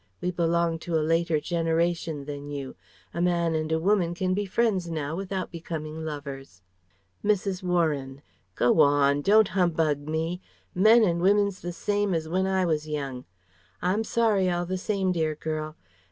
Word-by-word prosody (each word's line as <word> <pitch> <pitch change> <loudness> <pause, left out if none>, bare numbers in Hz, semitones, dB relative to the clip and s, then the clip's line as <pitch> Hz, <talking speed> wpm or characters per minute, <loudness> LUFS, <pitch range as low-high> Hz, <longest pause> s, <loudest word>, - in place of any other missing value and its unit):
We 180 - -1
belong 170 -1 +1
to 165 0 -3
a 155 - 0
later 165 -1 +2
generation 165 -2 -1
than 145 0 -7
you. 140 -2 -6 0.4
A 170 - -2
man 170 -2 +1
and 155 0 -2
a 160 - +2
woman 175 -1 +1
can 185 +1 0
be 205 +1 -1
friends 190 -4 0
now 155 -1 -3
without 190 0 -4
becoming 160 -2 -6
lovers." 140 - -7 0.6
Mrs. 200 -2 0
Warren: 150 -7 -1 0.3
"Go 120 +6 +3
on! 145 -1 +4
Don't 215 +5 +5
humbug 165 -5 +1
me. 165 +3 -2 0.3
Men 220 +5 +6
and 170 -4 +1
women's 200 +1 +2
the 175 - -4
same 205 +1 -1
as 160 -1 -2
when 185 +3 0
I 190 -1 +1
was 155 -2 -1
young. 140 -4 -4 0.5
I'm 190 +5 0
sorry, 215 -5 +2
all 175 0 -1
the 185 +2 -3
same, 195 -2 0
dear 160 -3 0
girl. 155 0 -4
170 Hz, 165 wpm, -26 LUFS, 155-185 Hz, 0.6 s, Men